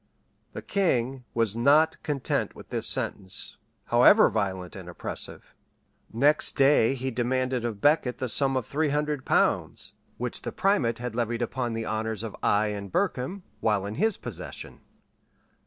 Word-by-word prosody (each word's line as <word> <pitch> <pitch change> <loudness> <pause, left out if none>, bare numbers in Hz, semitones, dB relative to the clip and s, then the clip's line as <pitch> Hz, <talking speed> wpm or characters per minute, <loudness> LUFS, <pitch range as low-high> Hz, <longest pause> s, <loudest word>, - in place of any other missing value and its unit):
The - - -7
king 130 - 0
was 115 -3 +1
not 145 +7 +3
content 140 -4 -2
with - - -13
this - - +1
sentence, 95 -1 -1 0.3
however - - +6
violent 95 -4 -2
and 95 -2 -9
oppressive. 85 - -4 0.6
Next 145 +7 +3
day 135 -3 +4
he 130 0 -3
demanded 125 +1 -1
of 110 -4 -4
Becket 145 -4 +2
the 130 - -2
sum 135 +3 +3
of 125 - -2
three 150 +5 0
hundred 150 -1 -1
pounds, - - 0 0.2
which - - -4
the - - -5
primate 140 - +1
had 125 -1 -5
levied 120 0 -1
upon 120 0 -2
the 115 0 -3
honors 110 0 -3
of 110 - -6
Eye 105 +1 +2
and 100 -2 -6
Berkham, 185 - -1 0.2
while 105 -3 +1
in 100 - -4
his 220 - 0
possession. - - -8
125 Hz, 155 wpm, -27 LUFS, 110-140 Hz, 0.6 s, however